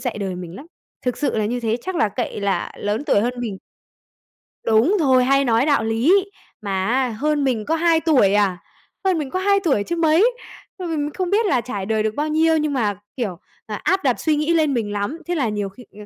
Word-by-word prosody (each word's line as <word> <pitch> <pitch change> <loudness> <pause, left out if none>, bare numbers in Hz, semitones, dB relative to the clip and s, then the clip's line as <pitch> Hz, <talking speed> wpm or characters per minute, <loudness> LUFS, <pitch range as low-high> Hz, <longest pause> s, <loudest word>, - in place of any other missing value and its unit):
dạy 245 -4 -3
đời 195 -3 -3
mình 180 0 -8
lắm, 285 - -11 0.4
thực 250 - 0
sự 290 - -1
là 215 - +1
như 245 +3 -2
thế 225 -1 0
chắc 375 -1 -4
là 305 -10 +2
cậy 235 0 -4
là 200 -1 -1
lớn 210 +7 -2
tuổi 240 - +3
hơn 240 +4 0
mình. 215 -6 -4 1.1
Đúng 230 - +3
rồi, 260 -5 +4
hay 275 +2 +3
nói 235 +1 +3
đạo 285 -6 +2
lý, 260 - +3 0.4
mà 195 -2 -2
á 255 +2 +1
hơn 290 +6 -1
mình 240 -6 0
có 320 - +1
2 330 0 +3
tuổi 275 - +3
à, 200 -3 +2 0.5
hơn 370 -3 +3
mình 290 -4 -3
có 370 - -2
2 400 +1 +3
tuổi 270 -11 +2
chứ 340 - -3
mấy, 335 +8 +3 0.4
ừm, 365 -3 -5
mình 295 -2 -1
không 370 -2 -2
biết 430 +4 +2
là 265 -11 +2
trải 205 -6 -5
đời 215 +1 0
được 215 0 -1
bao 300 +1 -1
nhiêu 320 +1 +3
nhưng 300 -1 -1
mà, 210 -7 0 0.2
kiểu, 200 -8 -3 0.3
à, 215 - -4
áp 380 0 +1
đặt 255 -4 +1
suy 310 -2 +1
nghĩ 305 +3 +1
lên 310 -4 +2
mình 225 -5 -1
lắm. 205 +11 -3
Thế 350 - -1
là 265 -8 0
nhiều 205 -2 -3
khi, 220 +6 -14 0.2
ờ, 210 - -9
260 Hz, 240 wpm, -21 LUFS, 215-320 Hz, 1.1 s, rồi